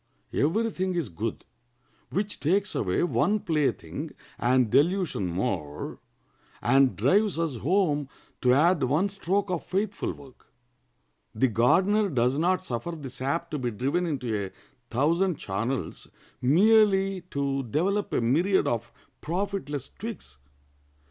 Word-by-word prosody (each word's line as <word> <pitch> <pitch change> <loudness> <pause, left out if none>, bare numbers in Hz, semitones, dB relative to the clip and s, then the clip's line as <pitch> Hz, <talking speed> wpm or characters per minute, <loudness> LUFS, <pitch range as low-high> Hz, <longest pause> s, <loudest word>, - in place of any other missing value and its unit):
Every 220 +10 +1
thing 185 -1 -2
is 165 -9 -1
good 105 +6 -4 0.6
which 205 +2 -2
takes 195 +6 +1
away 90 - 0
one 205 +4 +2
plaything 155 -8 -1 0.3
and 125 -2 +2
delusion 170 - +2
more, 85 -5 -3 0.6
and 135 +2 +3
drives 205 -2 +2
us 165 -6 -1
home 150 - +1 0.3
to 125 - +4
add 160 +5 +4
one 150 +10 +2
stroke 195 0 -1
of 175 - -2
faithful 200 +1 -2
work." 135 -3 -16 0.9
The 130 - +3
gardener 190 - +3
does 130 -1 +1
not 185 +3 +1
suffer 150 +3 -4
the 145 -5 -7
sap 140 +7 -2
to 150 - -2
be 125 -2 -1
driven 140 - -1
into 115 -10 -2
a - - -13 0.4
thousand 165 +6 +1
channels 115 +7 -3 0.3
merely 195 - +4
to 140 -1 -1
develop 180 - -1
a - - +1
myriad 165 +12 +2
of 115 -3 -2 0.3
profitless 175 -5 -3
twigs. 200 - -7
155 Hz, 130 wpm, -27 LUFS, 125-190 Hz, 0.9 s, to